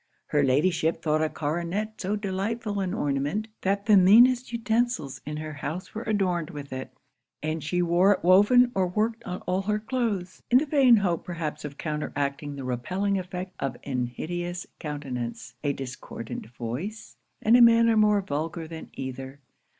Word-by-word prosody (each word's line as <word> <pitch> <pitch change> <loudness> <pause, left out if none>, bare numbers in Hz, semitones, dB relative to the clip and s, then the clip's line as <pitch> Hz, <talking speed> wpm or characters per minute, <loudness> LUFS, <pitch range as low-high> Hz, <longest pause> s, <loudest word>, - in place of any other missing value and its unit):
Her 150 - +3
Ladyship 155 +5 +2
thought 155 -1 +2
a 155 - +1
coronet 175 +9 -3
so 195 +3 -1
delightful 205 +2 -2
an 190 -2 -1
ornament, 145 +4 -1
that 200 +1 0
the 215 -1 +6
meanest 235 +7 +6
utensils 230 - -1
in 150 0 -4
her 155 0 -5
house 155 +5 -5
were 220 - -4
adorned 185 -7 0
with 145 -2 -8
it; 130 0 -5 0.5
and 155 0 -2
she 175 +3 0
wore 175 +4 +4
it - - -6
woven 205 +8 +6
or 190 -1 +1
worked 220 +5 -1
on 180 0 -5
all 185 +1 -1
her 210 +2 0
cloaths, 215 -5 -2
in 245 - +6
the 285 - +2
vain 275 -5 +5
hope 180 -5 0
perhaps 160 -3 -4
of 145 -1 -7
counteracting 145 -2 -3
the 135 - -6
repelling 185 +11 -1
effect 185 0 -6
of 135 - -3
an 125 -3 -1
hideous 175 +7 -4
countenance, 135 -6 -5
a 145 - +2
discordant 125 -5 -7
voice, 125 - -6 0.2
and 225 +2 +4
a 245 - +7
manner 230 -1 +6
more 210 -1 +4
vulgar 160 +1 -3
than 160 0 -9
either. 130 +1 -6
180 Hz, 165 wpm, -26 LUFS, 145-210 Hz, 0.5 s, a